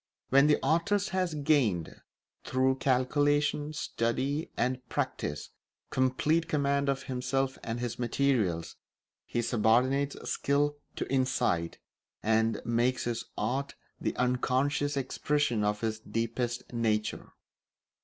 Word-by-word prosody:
When 140 +2 +6
the 150 - +5
artist 170 +8 +2
has 185 -4 -1
gained, 140 - +1 0.4
through 130 +1 +1
calculation, 145 +3 +1
study, 135 +4 -1
and, 125 +1 0
practice, 75 0 -3 0.4
complete 145 +6 +2
command 140 -1 +1
of 135 -1 -1
himself 130 +1 -1
and 115 +1 -3
his 120 -1 -4
materials, 120 -9 0 0.5
he 120 - -1
subordinates 125 +5 +2
skill 145 +1 +1 0.2
to - - -3
insight, 130 -10 +1 0.5
and 110 +1 +2
makes 120 +2 +1
his 115 -1 -2
art 135 +2 -2 0.2
the - - -2
unconscious 130 +3 +1
expression 135 -3 0
of 105 0 0
his 110 -1 -1
deepest 115 +2 -3
nature. 110 -2 -1
130 Hz, 110 wpm, -30 LUFS, 115-145 Hz, 0.5 s, When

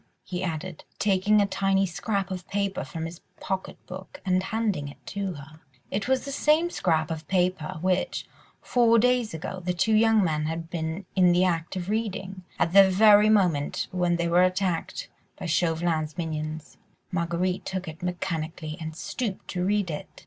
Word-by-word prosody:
he 180 -1 -4
added, 170 -1 -4
taking 200 +1 +3
a 205 - +4
tiny 195 0 +1
scrap 195 +2 -2
of 185 -1 -5
paper 200 -1 -1
from 160 +5 -5
his 165 +1 -7 0.2
pocket 190 -1 -3
book 185 +1 -9
and 185 -1 +2
handing 205 -7 -1
it 140 - -10
to 200 -2 -3
her. 155 +1 -12 0.3
It 200 +3 -1
was 265 +1 +1
the 280 - -4
same 310 +5 +2
scrap 160 - +1
of 160 -1 -5
paper 180 -5 0
which, 185 0 0 0.4
four 235 -2 +4
days 245 -3 +2
ago, 185 +4 -5
the 180 0 -1
two 220 +5 +2
young 220 -1 +5
men 155 -3 0
had 165 +1 -4
been 165 +2 -3
in 180 -2 +5
the 180 +1 +4
act 170 0 -1
of 180 -1 -4
reading, 195 -3 -3 0.2
at 165 - +1
the 195 -1 +8
very 210 +2 +6
moment 180 -9 +2
when 180 -1 +1
they 170 0 0
were 175 +1 +4
attacked 185 - -1 0.3
by - - -6
Chauvelin's 160 -2 0
minions. 155 -2 -4 0.3
Marguerite 175 +1 -1
took 185 -1 -4
it 160 +3 -8
mechanically 165 -3 -3
and 160 -1 -5
stooped 210 +3 -4
to 180 -1 -2
read 200 -2 +1
it. 150 - -5
185 Hz, 175 wpm, -26 LUFS, 165-200 Hz, 0.4 s, the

